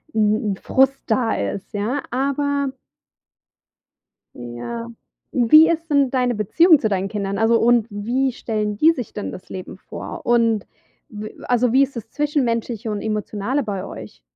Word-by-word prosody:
'n 215 -1 +2
'n - - -8
Frust 270 +4 +2
da 230 0 +1
ist, 140 - -4
ja, 230 +7 -2
aber 280 +2 0 1.7
ja. 120 - -6 0.5
Wie 310 +7 +7
ist 330 0 -1
denn 280 -3 +3
deine 250 -2 +1
Beziehung 315 - +5
zu 220 - 0
deinen 195 -1 -1
Kindern, 200 -1 -3
also, 225 +2 +4
und 235 -1 +3
wie 240 +6 -1
stellen 210 -3 -2
die 315 +8 +6
sich 250 -9 -6
denn 205 - -4
das 185 - -10
Leben 185 -1 -7
vor? - - -8
Und 230 -3 +2 0.4
w 215 0 -8
also, 245 -1 +2
wie 270 +1 +6
ist 275 0 -4
das 225 -1 -7
Zwischenmenschliche 240 -6 -1
und 210 - -3
Emotionale 215 +5 -2
bei 200 -4 -4
euch? - - -10
230 Hz, 155 wpm, -21 LUFS, 210-270 Hz, 1.7 s, Wie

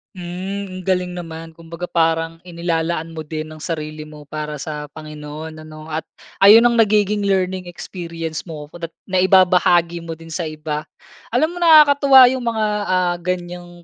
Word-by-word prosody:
Mm. 185 +2 -6
Ang 185 - -9
galing 180 -1 0
naman 165 -2 -8
kumbaga 165 +1 -11
parang 165 0 0
inilalaan 165 -1 -2
mo 160 -1 -6
din 155 0 -5
ang 155 - -11
sarili 155 -2 -5
mo 150 -1 -12
para 150 +1 -5
sa 150 +1 -6
Panginoon 155 +1 -8
ano? 155 0 -11
At 155 +1 -4 0.3
ayun 210 +4 +8
ang 240 -1 +3
nagiging 210 -1 +2
learning 185 -1 0
experience 170 -2 -6
mo 150 -2 -8
ko 175 - -11
da’t 165 -1 -6
na-ibabahagi 180 -2 +3
mo 165 -1 -7
din 165 0 -13
sa 165 0 -3
iba. 150 -1 -5 0.5
Alam 320 +3 +1
mo - - -8
nakakatuwa 285 -5 +7
yung 260 -2 -3
mga 220 -2 0 0.2
ah, 180 -1 +1
ganiyang 175 0 -5
170 Hz, 160 wpm, -20 LUFS, 160-185 Hz, 0.5 s, ayun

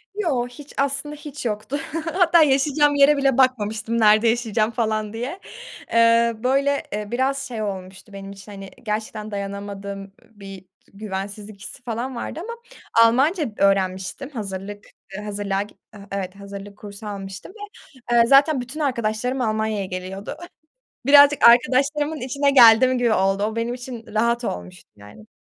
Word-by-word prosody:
Yo. 295 -12 -1
Hiç, 280 +4 -13
aslında 280 +2 -1
hiç 290 -2 -9
yoktu. 215 +5 -3 0.4
Hatta 350 -2 +5
yaşayacağım 290 +1 +2
yere 285 +1 +5
bile 270 -2 +2
bakmamıştım 230 -3 +1
"Nerede 215 +1 +5
yaşayacağım?" 225 -1 +1
falan 215 -2 -2
diye. 250 +11 -5 0.5
Eee, 230 0 +4
böyle, 275 +2 +1
ııı, 210 +1 -5
biraz 265 +3 0
şey 230 -4 -5
olmuştu 190 0 -7
benim 195 0 -8
için, 200 +1 -12
hani, 195 -1 -9
gerçekten 215 0 -4
dayanamadığım 200 0 -6 0.2
bir 195 -3 -12 0.3
güvensizlik 200 0 -7
hissi 245 - -9
falan 245 +2 -4
vardı 240 - -5
ama 465 +4 -6 0.5
Almanca 275 +10 +3
öğrenmiştim. 195 +5 0
Hazırlık, 205 -4 -7 0.3
ııı, 205 - -6
hazırlığa 200 -1 -2
git 205 0 -9 0.3
Evet. 195 -1 -4
Hazırlık 200 0 -10
kursu 205 +1 -10
almıştım 195 - -7
ve, - - -15 0.6
eee, 235 - +7
zaten 275 +1 +5
bütün 255 +6 -8
arkadaşlarım 250 -2 -1
Almanya'ya 220 -3 -1
geliyordu. 185 +6 -6 0.7
Birazcık 285 -2 +7
arkadaşlarımın 280 +5 +2
içine 280 +2 +1
geldim 255 0 +7
gibi 240 -2 +2
oldu. 195 +1 +1
O 215 +2 -2
benim 230 +1 -2
için 245 -2 -9
rahat 235 +2 +1
olmuştu 90 - -6
yani. 105 +1 -15
225 Hz, 140 wpm, -22 LUFS, 200-265 Hz, 0.7 s, eee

